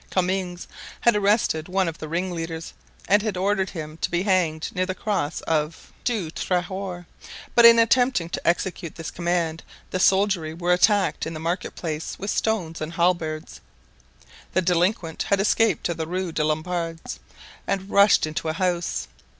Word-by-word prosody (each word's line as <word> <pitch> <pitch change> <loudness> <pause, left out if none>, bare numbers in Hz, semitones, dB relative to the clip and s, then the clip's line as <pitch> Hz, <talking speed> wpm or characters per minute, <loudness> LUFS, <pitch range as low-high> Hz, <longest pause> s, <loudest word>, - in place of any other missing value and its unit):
Comminges 185 -1 -1 0.4
had 235 -2 +4
arrested 200 -6 +1
one 190 0 +1
of 165 -1 -5
the 155 - -6
ringleaders 165 -1 -3 0.3
and 205 +2 +5
had 210 -3 -2
ordered 190 0 +1
him 155 -2 -7
to - - -1
be 175 +1 0
hanged 175 -5 +1
near 185 0 0
the 185 - -2
cross 195 -9 -2
of 155 0 -2
Du 210 -10 -1
Trahoir; 180 0 -3 0.5
but 235 - +7
in 230 0 +8
attempting 240 -4 +3
to - - -4
execute 175 -1 -1
this 165 -1 -6
command 170 -2 -1 0.3
the 185 - -1
soldiery 190 -5 +2
were 175 +1 +1
attacked 200 0 +2
in 165 - -5
the - - -5
market 170 +3 -3
place 160 -2 -4
with 200 +2 -3
stones 180 -8 -1
and 155 +2 -4
halberds; 170 -3 -1 0.9
the 185 - +3
delinquent 175 0 +1
had 200 - +3
escaped 220 +2 +2
to 170 - 0
the 160 -1 -4
Rue 180 0 -2
des 150 - 0
Lombards 165 +1 -3 0.5
and 195 -1 -1
rushed 200 -3 +5
into 155 +1 -3
a - - -1
house. 175 0 -1
180 Hz, 165 wpm, -24 LUFS, 165-195 Hz, 0.9 s, in